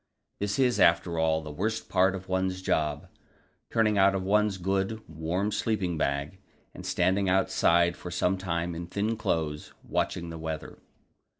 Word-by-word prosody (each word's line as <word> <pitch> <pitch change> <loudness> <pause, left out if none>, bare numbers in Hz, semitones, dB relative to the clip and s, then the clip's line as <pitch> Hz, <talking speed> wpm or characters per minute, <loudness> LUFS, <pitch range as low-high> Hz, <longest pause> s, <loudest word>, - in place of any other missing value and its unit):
This 100 0 -1
is, 125 -5 +2
after 85 -2 +3
all, 80 0 +2
the 75 - -7
worst 110 +8 -2
part 95 +1 +3
of 95 0 -8
one's 95 0 -1
job 75 -4 0 0.6
turning 110 -2 +2
out 95 0 +5
of 95 - -1
one's 105 0 +2
good, 95 +4 -1
warm 80 +6 -2
sleeping 100 -6 -1
bag, 70 +3 -2 0.3
and - - -9
standing 95 +2 +1
outside 85 -2 +3
for 90 - -8
some 90 +2 +1
time 85 -2 -2
in 85 +1 -6
thin 105 +5 -1
clothes, 80 -8 -2
watching 85 -2 -2
the 80 - -7
weather. 80 -1 -6
90 Hz, 160 wpm, -28 LUFS, 85-100 Hz, 0.6 s, out